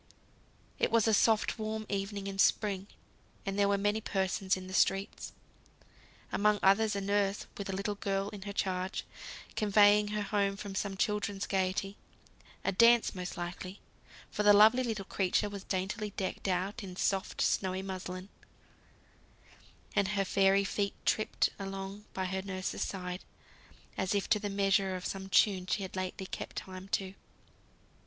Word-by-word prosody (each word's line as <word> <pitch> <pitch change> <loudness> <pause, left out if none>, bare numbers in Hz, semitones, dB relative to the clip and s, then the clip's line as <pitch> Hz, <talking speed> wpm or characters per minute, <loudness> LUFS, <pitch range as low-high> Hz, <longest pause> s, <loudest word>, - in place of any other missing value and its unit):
It - - +2
was 230 -1 +3
a - - +4
warm - - +5
soft 220 +1 +3 0.3
evening 200 0 -2
in 195 0 -5
spring, 200 -1 +2 0.6
and 195 - -1
there 200 - +4
were 200 - +3
many 205 +2 +1
persons 190 -1 0
in 185 - -8
the 185 - -8
streets. 195 +1 +1 1.0
Among 210 0 +3
others, 210 +2 +4
a 200 - -1
nurse 200 0 0
with 200 -1 -5
a 190 - -2
little 200 +2 -1
girl 195 0 -2
in 205 -2 -9
her 200 +1 -5
charge, 190 -1 -2 0.5
conveying 210 0 +5
her 210 0 -2
home 200 -1 0
from 200 -1 -6
some 195 0 -2
children's 205 -1 -1
gaiety; 195 +1 -1 0.7
a 195 - +2
dance 235 +4 +5
most 180 0 -5
likely, 180 +2 -6 0.5
for - - -1
the 205 0 +7
lovely 220 +5 +7
little 220 -5 -3
creature 195 +2 +1
was 200 -1 -7
daintily 195 +3 -2
decked 195 -1 -3
out 190 +3 -1
in 185 -2 -7
soft, 195 +1 -1
snowy 190 0 +1
muslin; 185 0 -6 1.7
and 200 -2 +3
her 195 -1 0
fairy 195 +1 +4
feet 200 0 -1
tripped 215 - +2
along 195 +1 -6
by 190 - -1
her 190 +1 -2
nurse's 185 -1 -4
side 180 -1 -4 0.8
as 190 +1 0
if 200 - 0
to 210 - +4
the 205 0 -3
measure 195 -1 +2
of 180 - -6
some 195 0 -4
tune 190 -2 +3
she 200 - 0
had 190 - -7
lately 185 +1 -3
kept - - -6
time 185 0 -7
to. 195 -1 -2
195 Hz, 160 wpm, -32 LUFS, 190-205 Hz, 1.7 s, the